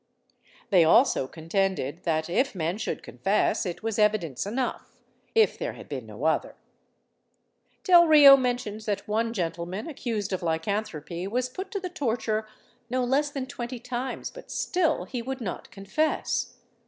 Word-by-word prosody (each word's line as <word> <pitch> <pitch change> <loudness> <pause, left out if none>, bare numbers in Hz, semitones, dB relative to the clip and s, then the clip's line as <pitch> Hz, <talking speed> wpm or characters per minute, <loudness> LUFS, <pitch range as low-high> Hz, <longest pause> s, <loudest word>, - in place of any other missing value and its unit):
They 180 -4 +6
also 165 - +4
contended 170 -1 -2
that, 160 -2 0
if 255 +8 0
men 170 +3 -2
should - - -3
confess, 195 0 0
it 175 +4 -6
was 225 -1 -2
evidence 205 - +1
enough, 245 +4 -3 0.4
if 445 -1 +4
there - - -3
had - - -12
been 130 -6 -6
no 110 +5 -9
other. 160 0 +1 1.3
Delrio 315 -6 +9
mentions 245 -5 -2
that 205 0 -2
one 225 +2 0
gentleman 175 - -3
accused 225 -9 -3
of 185 - -2
lycanthropy 170 0 -2
was 250 +4 -1
put 375 +9 -6
to 400 - -3
the 370 -1 -5
torture 225 -9 -1 0.4
no 255 +1 0
less 275 +4 +1
than 275 -2 -4
twenty 245 -1 -6
times; 250 +2 -4
but - - -12
still 330 -4 0
he 250 -2 -4
would 265 +2 -5
not 200 -7 -5
confess. 255 +11 -1
215 Hz, 150 wpm, -27 LUFS, 180-260 Hz, 1.3 s, Delrio